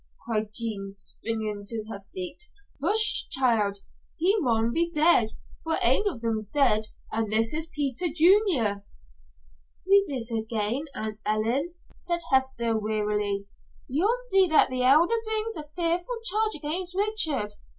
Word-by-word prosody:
cried 215 -2 -2
Jean, 215 -3 -4
springing 215 +1 -4
to 220 +1 -4
her 215 -3 -7
feet. 185 - -7 0.4
"Hush, 425 +8 +5
child. 225 -6 +2 0.4
He 365 +5 +2
maun 230 - 0
be 335 +1 +1
dead, 305 -9 +3 0.3
for 320 0 -1
ain 420 - +3
of 255 -11 -8
them's 220 -3 -2
dead, 220 -5 +2 0.2
and 220 -1 -2
this 225 +3 +3
is 315 +1 -2
Peter 295 +1 -2
Junior." 325 - +2 1.0
"Read 395 0 +5
it 245 -5 -4
again, 225 +5 -2
Aunt 215 -1 -4
Ellen," 235 +11 -1 0.2
said 345 -1 -3
Hester, 260 -4 +1
wearily. 210 -2 -1 0.4
"You'll 380 - +1
see 385 -1 +6
that 315 -5 +4
the 255 0 -1
Elder 325 - +4
brings 440 0 -1
a 300 -2 -7
fearful 350 +7 0
charge 440 -1 0
against 350 +5 -3
Richard. 325 - -1
265 Hz, 140 wpm, -26 LUFS, 220-345 Hz, 1.0 s, see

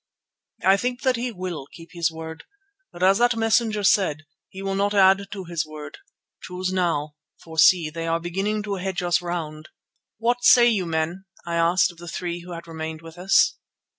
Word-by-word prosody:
"I 190 +1 +5
think 245 +3 -3
that 260 -1 +3
he 240 +1 -3
will 180 -8 -6
keep 165 0 -13
his 170 -1 0
word, 160 0 -9 0.5
but 175 - -6
as 195 +3 +5
that 240 0 +3
messenger 225 -1 +1
said, 160 -6 +2 0.2
he 190 +1 -9
will 195 0 -2
not 200 +1 0
add 195 0 +5
to 195 -2 -6
his 170 -2 -2
word. 155 -1 -10 0.4
Choose 185 0 -4
now, 155 -5 -1 0.2
for 160 -1 -7
see, 165 -2 +5
they 165 +1 -5
are 165 0 +1
beginning 195 +5 -2
to 200 -2 -3
hedge 185 -1 -3
us 175 -1 +2
round." 160 -3 -5 0.5
"What 235 +2 +1
do 245 -1 +7
you 225 -5 +3
say, - - -6
men?" 165 +4 -2 0.2
I 170 - -4
asked 170 +3 +3
of 170 - -19
the 175 - -10
three 175 0 -4
who 175 0 -9
had 170 0 -8
remained 160 0 -6
with 165 +1 -12
us. 195 +2 +3
180 Hz, 195 wpm, -23 LUFS, 165-200 Hz, 0.5 s, do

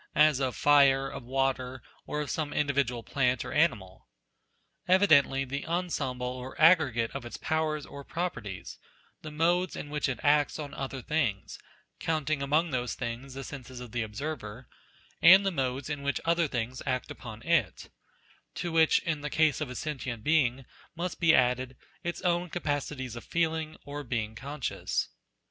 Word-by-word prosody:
as 150 -3 +5
of 130 -4 -1
fire, 135 +1 +5
of - - -7
water, 130 0 -1 0.3
or 150 - -2
of 150 - -3
some 150 -2 -2
individual 140 -5 0
plant 125 -2 0
or - - -6
animal? 115 - 0 0.8
Evidently 155 -8 +5
the 140 +2 -4
ensemble 165 -8 -2
or 125 +1 -6
aggregate 140 -9 +5
of 135 - -5
its 120 - -7
powers 155 -2 -1
or 140 0 -9
properties: 120 - -5 0.4
the 155 - -7
modes 175 +4 +1
in 145 - -7
which 150 -2 0
it 125 - -3
acts 145 -1 +3
on 145 -2 -6
other 135 -1 -5
things 130 -11 -1 0.4
(counting 155 -2 -1
among 155 +4 +1
those 125 -1 -1
things 125 +2 -5
the 135 - -5
senses 130 -3 -8
of 125 -2 -9
the 120 0 -1
observer) 110 +1 -5 0.5
and 190 +4 +9
the 195 - +2
modes 130 -4 -2
in 145 -1 -3
O - - -10
' - - -9
which 140 - 0
other 170 0 +2
things 125 -1 -3
act 130 -1 -1
upon 110 -3 -9
it; 170 -1 0 0.6
to 175 - -3
which, 160 -1 +5
in 160 -3 -2
the 150 - -3
case 155 -2 +2
of 150 - -2
a 125 - -7
sentient 130 -6 -4
being, 135 -4 +2 0.3
must 175 +1 -4
be 165 -2 +5
added, 125 0 +1 0.3
its 170 -1 -3
own 175 0 +1
capacities 145 -6 -3
of 120 - -7
feeling, 160 -2 -1
or 145 +1 -5
being 115 -4 -2
conscious. 135 +3 -3
140 Hz, 170 wpm, -29 LUFS, 125-155 Hz, 0.8 s, and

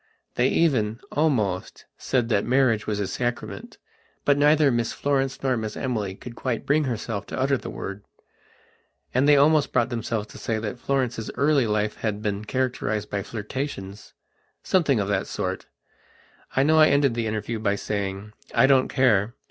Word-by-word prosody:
They 125 - +2
even, 115 -9 +1
almost, 110 - 0
said 125 -3 0
that 105 -3 +2
marriage 120 -4 +2
was 105 -1 -1
a 100 - 0
sacrament; 120 +4 -4 0.5
but 145 - +5
neither 145 0 +4
Miss 120 -1 0
Florence 135 -2 -1
nor 130 -2 +2
Miss 110 -2 -4
Emily 105 -7 -2
could 120 +3 -10
quite 120 -3 -3
bring 150 +1 +2
herself 110 -4 -3
to - - -5
utter 135 +1 +2
the - - -6
word. 100 +1 -6 1.1
And 135 +4 +3
they 145 - +7
almost 150 +1 +4
brought - - +2
themselves 115 -2 -2
to - - -11
say 110 - -1
that 110 +2 -4
Florence's 125 -5 -1
early 140 -4 +3
life 105 0 -1
had 105 -1 -3
been 105 -1 -2
characterized 110 -4 -2
by 100 - -1
flirtationssomething 115 - -3
of 100 - -1
that 100 -2 0
sort. - - -4 0.9
I 135 - +4
know 155 +2 +4
I 155 - +8
ended 140 -3 +3
the 115 -1 -2
interview 110 +1 -3
by 100 -2 +1
saying: 100 0 -4 0.2
"I - - +6
don't 135 -1 +4
care. 120 -5 +2
120 Hz, 165 wpm, -24 LUFS, 105-135 Hz, 1.1 s, I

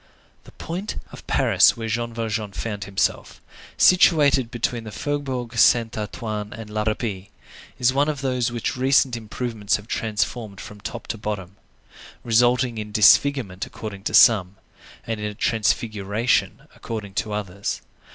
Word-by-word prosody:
The - - -14
point 185 +6 -5 0.2
of - - -12
Paris - - +4
where 115 -1 -4
Jean 115 +1 -2
Valjean 110 -3 -3
found 105 -1 -4
himself, 100 -1 -1 0.4
situated 145 -8 +5
between 120 0 -2
the 110 - -8
Faubourg 130 -3 -3
Saint 115 -1 +4
Antoine 105 -1 -4
and 110 -2 -9
la 105 0 -2
Râpée, 105 -3 -3 0.5
is 125 +1 +2
one 145 +3 +2
of 145 -3 -3
those 125 -3 0
which 120 -1 -2
recent 130 0 +3
improvements 110 -2 -2
have 105 +1 -7
transformed 110 -2 -2
from 105 -1 -10
top 120 - -6
to 110 - -5
bottom,—resulting 115 +4 -2
in 105 0 -6
disfigurement 110 -2 +4
according 100 -3 -8
to - - 0
some, 100 -5 +6 0.5
and 115 -1 -3
in 105 - -3
a 105 - -6
transfiguration 110 +1 0
according 105 -4 -6
to 105 - -2
others. 100 -1 -4
115 Hz, 140 wpm, -23 LUFS, 105-125 Hz, 0.5 s, some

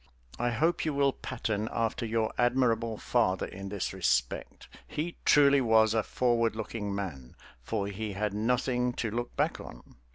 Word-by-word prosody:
I 120 +1 +1
hope 160 +9 +1
you 155 -3 -1
will 140 -1 +3
pattern 110 -3 -3
after 115 +1 -1
your 110 0 0
admirable 120 -3 +1
father 110 -6 +1
in 95 +1 -8
this 100 -2 -3
respect; 65 -10 -1 0.2
he 165 +3 -4
truly 140 -1 +6
was 110 -2 +4
a 110 - +3
forward 115 0 +1
looking 105 -2 -4
man, 75 -11 -6 0.3
for 100 - -2
he 100 +1 -4
had 105 +1 -2
nothing 125 +3 0
to 115 -3 -3
look 120 +2 -4
back - - 0
on. - - -12
115 Hz, 160 wpm, -29 LUFS, 100-125 Hz, 0.3 s, truly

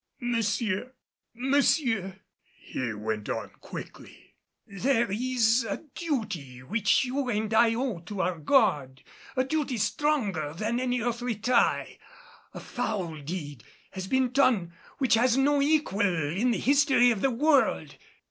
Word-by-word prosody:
"Monsieur, 230 -1 -1 0.4
monsieur," 240 - +1 0.4
he 125 -3 -4
went 105 0 -4
on - - -4
quickly, - - -11 0.3
"there 230 +2 0
is 235 +1 +2
a 220 +5 -5
duty 180 - -4
which 210 - +2
you 260 +1 -2
and 215 -1 -1
I 225 0 +4
owe 240 -6 -2
to 185 +3 -5
our 180 -2 -1
God 150 - +2 0.3
a 260 - +2
duty 275 -2 -2
stronger 205 - -1
than 225 +5 -1
any 250 -1 -1
earthly 240 0 -2
tie. 235 +4 +1 0.5
A - - -8
foul 180 - -4
deed 145 -5 -6 0.3
has 190 -1 -6
been 260 +1 +1
done 235 -10 +2 0.2
which 265 -3 +2
has 240 +2 +3
no 285 +1 +3
equal 290 -9 +1 0.3
in 215 +9 +1
the 235 - +1
history 275 -3 +4
of 215 -4 -2
the 270 - +3
world." 280 +3 +2
230 Hz, 135 wpm, -27 LUFS, 190-260 Hz, 0.5 s, I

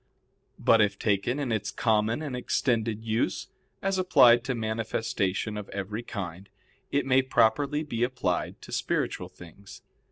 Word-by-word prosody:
But 115 -1 +4
if 100 -1 +1
taken 105 +5 0
in 140 -4 -2
its 110 -2 -1
common 110 +4 +1
and 140 -4 -4
extended 115 -3 0
use, 110 0 -1 0.3
as 195 -1 0
applied 125 -10 +6
to 130 -1 -1
manifestation 110 -2 -2
of 105 - -7
every 100 +3 -4
kind, 95 -5 -7 0.4
it 140 -1 +1
may 130 0 +4
properly 140 +4 +2
be 120 -6 -4
applied 120 -8 -1
to - - -11
spiritual - - -2
things. 95 +3 -14
115 Hz, 140 wpm, -27 LUFS, 105-130 Hz, 0.4 s, applied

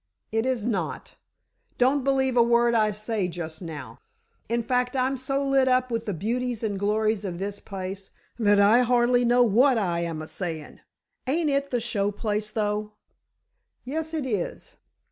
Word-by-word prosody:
"It 225 +3 0
is 250 -5 -1
not! 195 -9 -3 0.6
Don't 260 +2 +3
believe 265 -1 +1
a 240 - +6
word 235 0 +3
I 215 -2 +3
say 210 -1 -2
just 165 -2 -6
now. 155 -6 -8 0.5
In 235 0 0
fact, 250 +2 0
I'm 260 +1 +1
so 275 +2 -2
lit 270 -1 +3
up 255 -1 +2
with 230 0 -2
the 205 - -1
beauties 240 +5 -2
and 205 -3 -2
glories 215 +1 +1
of 180 -4 -4
this 200 +2 -4
place, 195 0 -7 0.3
that 205 -2 +4
I 210 +5 +6
hardly 245 0 +3
know 245 +1 +4
what 245 +4 +4
I 175 -5 0
am 170 -2 -3
a - - -8
saying! 160 -5 -6 0.5
Ain't 305 +2 +1
it 280 0 0
the 245 - 0
show 210 -4 0
place, 210 0 -2
though!" 210 -1 -2 0.9
"Yes, 315 +4 -4
it 300 -4 -2
is. 210 -8 -3
225 Hz, 170 wpm, -26 LUFS, 200-250 Hz, 0.9 s, a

